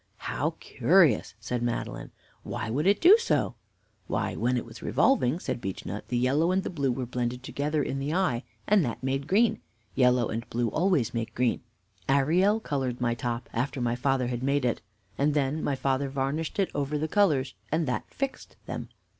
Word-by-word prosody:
"How - - -2
curious!" - - +3
said 115 +3 -3
Madeline. 120 -1 -3 0.3
"Why 110 - -4
would 150 +8 0
it 200 +1 +4
do 375 +6 +8
so?" 465 - +1 0.5
"Why, - - -1
when 125 +1 +1
it 120 - -3
was - - -12
revolving," 125 +5 +2
said 150 - -4
Beechnut, 95 +1 -5
"the 125 - -1
yellow 140 +8 +2
and 190 +1 +1
the - - -4
blue 140 -6 0
were 125 +1 -2
blended 125 0 -3
together 145 +3 -1
in 135 +1 -3
the 140 +2 -2
eye, 165 -9 +1 0.2
and 205 -3 +4
that 120 -1 -4
made 135 +2 -1
green. 220 +4 +3 0.3
Yellow 125 -2 +3
and 115 +2 -4
blue 120 0 0
always 155 - +1
make 115 -1 -3
green. 125 -1 +1 0.5
Arielle 180 +11 +3
colored 130 -4 -2
my 120 -1 +1
top, 120 0 -3
after 130 +4 -1
my 120 -1 0
father 130 0 +1
had 120 0 -3
made 140 0 +1
it, 120 - 0 0.4
and 145 +1 +2
then 145 +2 0
my 140 - 0
father 135 +1 0
varnished 140 +4 -2
it 195 -2 +1
over 145 +1 -1
the 155 +2 -1
colors, 150 -10 +2 0.2
and 160 0 +1
that 125 - -3
fixed 275 -1 -4
them. - - -5
135 Hz, 190 wpm, -28 LUFS, 120-155 Hz, 0.5 s, do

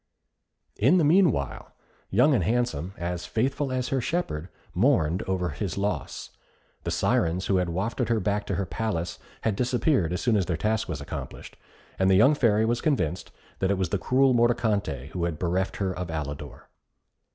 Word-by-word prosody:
In 135 - +4
the 170 - +3
meanwhile, 155 - +2 0.4
Young 125 +9 +4
and 110 -9 +2
Handsome, 100 -6 -1
as 85 +1 -4
faithful 135 +4 -1
as 130 -1 -1
her 135 -2 0
shepherd, 95 - -2 0.2
mourned 80 +5 +2
over 90 -2 0
his 100 -4 -4
loss. 100 -7 -3 0.5
The - - -1
Syrens 85 +3 +1
who 95 - +2
had 90 -1 0
wafted 95 +9 -2
her 115 -1 +2
back 105 +1 -1
to 100 - -1
her 95 +2 -1
palace 90 -4 -3 0.2
had 110 -3 0
disappeared 125 - +1
as 90 - -1
soon 120 -3 +2
as 95 - 0
their 85 -3 -1
task 110 +4 -1
was 75 -4 -4
accomplished, 70 - -7 0.4
and 95 0 +3
the 95 - +5
young 115 +10 +6
Fairy 110 -6 +3
was 120 +1 0
convinced 90 - -1 0.3
that 95 - +1
it 100 - +1
was 95 -3 -1
the 100 - -1
cruel 130 +3 +3
Mordicante 105 - +1
who 85 -2 -2
had 85 -3 -2
bereft 90 +3 -1
her 95 -2 -1
of 90 -1 -5
Alidor. 75 -3 -6
100 Hz, 180 wpm, -26 LUFS, 85-120 Hz, 0.5 s, young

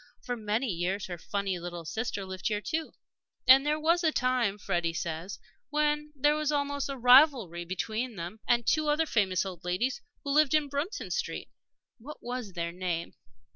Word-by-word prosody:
For 245 - -2
many 220 +2 -1
years 190 -1 -1
her 175 -2 -6
funny 195 0 -2
little 175 -1 -6
sister 215 +1 -3
lived 190 0 -4
here, 210 -2 0
too. 315 +8 -3 0.5
And 265 +1 +9
there 300 +1 +1
was 335 +3 +2
a 320 - +4
time, 250 -7 +1
Freddie 175 -5 -1
says, 165 +4 -4 0.3
when 300 0 0
there 295 +2 +3
was 305 -1 0
almost 285 -1 -1
a 275 - -4
rivalry 245 - +5
between 220 +7 -3
them 175 +5 -6
and 235 -1 +3
two 310 +4 +2
other 305 +2 +2
famous 195 - +1
old 185 -3 -7
ladies 210 - -1 0.2
who 280 - -2
lived 305 +1 +4
in 300 -2 +2
Bruton 300 - -3
Street 485 - -3 0.5
what 285 +7 -9
was 245 -5 -5
their 170 -1 -3
name? 175 -2 -3
235 Hz, 175 wpm, -29 LUFS, 185-290 Hz, 0.5 s, And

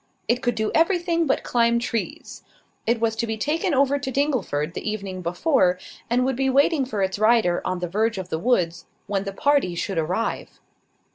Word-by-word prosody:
It 245 +1 +1
could 245 -2 0
do 220 -1 -1
everything 335 -1 +2
but - - +1
climb 235 -1 +2
trees. 235 -1 -4 0.5
It 230 0 +2
was 225 -1 0
to 235 - -1
be 220 0 -2
taken 310 - 0
over 280 +1 +3
to 265 - -4
Dingleford 250 - -1
the - - -4
evening 195 -3 -5
before, 180 - +2 0.3
and 250 +2 +2
would 265 -1 0
be 265 +1 +1
waiting 280 +2 +3
for 215 -6 -2
its 190 +1 -2
rider 215 -5 +3
on 185 - -2
the 180 0 -3
verge 215 +4 0
of 185 -2 -5
the 160 - -2
woods, 175 -7 0 0.2
when 200 -1 -2
the 195 - -3
party 275 -4 +1
should 180 0 -2
arrive. 180 +8 -3
230 Hz, 195 wpm, -23 LUFS, 190-270 Hz, 0.5 s, over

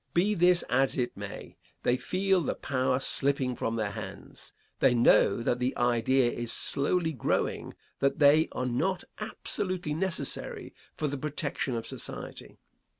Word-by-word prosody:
Be 195 +5 +3
this 180 -1 +4
as 135 +2 +1
it 120 -1 -1
may, 100 0 -8 0.3
they 125 - +3
feel 185 +8 +1
the 155 - -2
power 130 -1 0
slipping 135 -2 0
from 115 0 -2
their 110 -3 -1
hands. - - -8 0.3
They 125 - +4
know 115 -2 +4
that 120 +1 0
the 125 +1 -1
idea 120 +1 +2
is 120 -1 -2
slowly 160 +7 +1
growing 130 - -1 0.2
that 140 0 +1
they 155 +1 +5
are 125 - -2
not 180 +10 -1 0.2
absolutely 185 -6 -2
necessary 185 +3 -3 0.2
for 155 - -1
the 140 -1 -4
protection 140 -3 -2
of 115 - -4
society. - - -7
135 Hz, 150 wpm, -29 LUFS, 125-165 Hz, 0.3 s, they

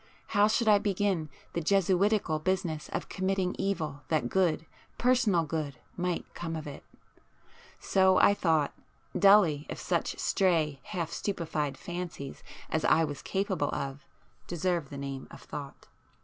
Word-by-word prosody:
How 205 0 +4
should 220 +1 +1
I 210 -1 +7
begin 195 -5 0 0.2
the 170 - -1
jesuitical 195 -1 +2
business 170 -3 -1
of - - -3
committing 190 -1 0
evil 155 -7 -2
that 155 -7 0
good, 175 -4 +1 0.3
personal 240 -9 +3
good, 150 -2 -3 0.2
might 180 -1 -1
come 165 -1 -4
of 160 -1 -5
it? 145 -1 -8 1.0
So 190 -1 +4
I 200 - +6
thought, 160 -7 +1 0.4
dully, 195 -8 +5
if - - -5
such - - -1
stray 160 -7 +1
half 175 -6 -3
stupefied 155 -8 -2
fancies 175 -6 -6 0.3
as 160 - 0
I 165 - +4
was 145 -3 -4
capable 195 -1 -1
of, 140 +1 -4 0.4
deserved 175 -3 -1
the 140 - -7
name 135 -1 -5
of - - -12
thought. 140 -2 -8
170 Hz, 140 wpm, -30 LUFS, 150-195 Hz, 1.0 s, I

